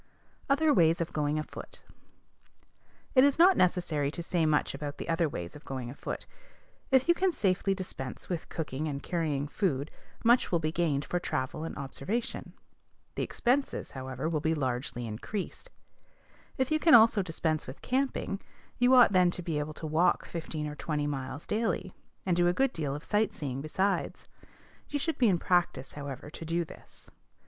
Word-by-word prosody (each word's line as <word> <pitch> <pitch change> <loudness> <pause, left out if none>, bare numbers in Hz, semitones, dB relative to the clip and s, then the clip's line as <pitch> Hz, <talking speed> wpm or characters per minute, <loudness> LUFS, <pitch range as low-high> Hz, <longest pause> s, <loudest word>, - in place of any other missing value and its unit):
OTHER 295 +2 +4
WAYS 165 -3 +4
OF 170 0 -3
GOING 150 0 0
AFOOT. 155 - -7 1.3
It 260 - +7
is 280 -1 +4
not 360 +3 +7
necessary 170 -6 +2
to 170 +3 -5
say 165 -2 +1
much 150 -1 +2
about 145 +1 -5
the - - -6
other 165 -1 +1
ways 85 -9 -6
of 150 - -11
going 130 -3 -5
afoot. 140 - -6 0.6
If 265 +1 +4
you 345 - +7
can 370 +1 +2
safely 195 - +1
dispense 155 -9 -6
with 175 -3 -4
cooking 155 -2 -3
and 140 -2 -4
carrying 155 -5 -1
food, 145 -4 -1 0.3
much 240 +2 +4
will 175 - +4
be 155 -1 -1
gained 155 -4 0
for 175 - -1
travel 130 -1 -3
and 165 - -5
observation. 140 - -3 0.6
The - - -3
expenses, 265 +3 0
however, 130 +2 -4
will 160 -2 0
be 160 +2 +1
largely 125 -3 -2
increased. 185 - -5 0.9
If 260 +1 0
you 310 - +3
can 320 0 +7
also 225 -2 +7
dispense 160 -3 -1
with 130 - -9
camping, 255 -6 -1 0.4
you 250 +1 +6
ought 245 -4 +8
then 180 -2 +5
to 180 0 -4
be 160 -3 -1
able 150 +1 -4
to 160 - -7
walk 155 +3 +2
fifteen 160 -2 -4
or 150 - -4
twenty 150 -1 -2
miles 135 0 -4
daily, 210 -4 -1 0.3
and 180 -2 +2
do 175 0 +3
a 175 - +3
good 265 +6 +1
deal 145 -4 -2
of 150 - -7
sight 210 0 +1
seeing 135 -2 -4
besides. 190 +7 -1 0.6
You 290 - -1
should 320 +3 -2
be 245 - +5
in 180 - +3
practice, 170 -7 +1
however, 140 0 -7
to - - -8
do 165 +1 -1
this. - - -14
165 Hz, 180 wpm, -30 LUFS, 145-200 Hz, 1.3 s, ought